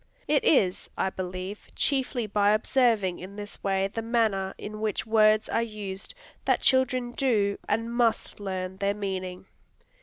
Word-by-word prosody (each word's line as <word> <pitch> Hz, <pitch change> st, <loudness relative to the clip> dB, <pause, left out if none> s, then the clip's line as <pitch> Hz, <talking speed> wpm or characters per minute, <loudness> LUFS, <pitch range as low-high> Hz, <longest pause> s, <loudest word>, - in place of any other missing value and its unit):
It -, -, +3 dB
is, 200 Hz, -, +2 dB
I 190 Hz, -, 0 dB
believe, 185 Hz, +2 st, -6 dB
chiefly 265 Hz, -4 st, +1 dB
by 205 Hz, 0 st, +3 dB
observing 215 Hz, -5 st, +2 dB
in 190 Hz, +2 st, -9 dB
this 205 Hz, 0 st, -8 dB
way 195 Hz, -1 st, +1 dB
the 225 Hz, +3 st, -4 dB
manner 220 Hz, -5 st, +1 dB
in 215 Hz, +1 st, -7 dB
which 215 Hz, -2 st, -1 dB
words 215 Hz, -1 st, +4 dB
are 230 Hz, -, +1 dB
used, 210 Hz, -, -5 dB, 0.3 s
that -, -, +2 dB
children 255 Hz, -2 st, +2 dB
do 220 Hz, -6 st, +1 dB
and 230 Hz, +2 st, 0 dB
must 235 Hz, -3 st, +1 dB
learn 190 Hz, -2 st, -4 dB
their 200 Hz, +1 st, 0 dB
meaning. 190 Hz, -2 st, -4 dB
210 Hz, 150 wpm, -27 LUFS, 190-230 Hz, 0.3 s, words